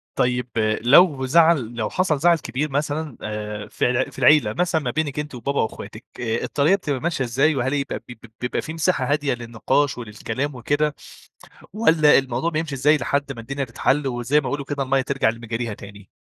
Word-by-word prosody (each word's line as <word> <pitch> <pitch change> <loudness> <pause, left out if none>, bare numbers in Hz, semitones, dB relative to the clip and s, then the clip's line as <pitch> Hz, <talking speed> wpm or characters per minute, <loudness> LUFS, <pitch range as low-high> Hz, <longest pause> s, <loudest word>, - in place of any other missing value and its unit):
طيب 125 0 0 0.3
لو 135 +2 +5
زعل 150 -5 +3
لو 110 -2 -2
حصل 180 -6 0
زعل 170 +2 +4
كبير 150 +1 -3
مثلًا 150 0 -2
آآ 105 0 -5
في - - 0
الع 125 +1 0
في - - -11
العيلة، 145 +4 +5
مثلًا 175 -2 0
ما - - -2
بينِك 150 -2 -2
أنتِ 150 -3 -5
وبابا 140 +4 -1
واخواتِك، 110 - -6
آآ 115 -1 -2
الطريقة 150 +6 +2
بتبقى 145 -8 -3
ماشية 165 -6 -1
إزاي؟ 135 +6 +2
وهل 130 +2 -1
يبقى 140 -1 -2
ب - - -15
ب 115 -1 -12 0.2
بيبقى 125 - -1
في 160 - -7
مساحة 165 -4 0
هادية 145 -3 +1
للنقاش 120 +4 -1
وللكلام 120 +5 -4
وكده 145 +5 0 0.8
والّا 165 -8 +5
الموضوع 135 +4 -1
بيمشي 155 -3 -3
إزاي 145 +4 +3
لحد 140 +1 -1
ما 120 - -9
الدنيا 140 +4 -4
تتحل، 135 +4 0
وزي 120 +4 +1
ما 140 - -7
يقولوا 145 -1 -3
كده 140 0 -3
المَيَّة 135 0 +1
ترجع 135 -2 0
لمجاريها 115 0 -3
تاني؟ 100 0 -13
135 Hz, 190 wpm, -22 LUFS, 120-150 Hz, 0.8 s, لو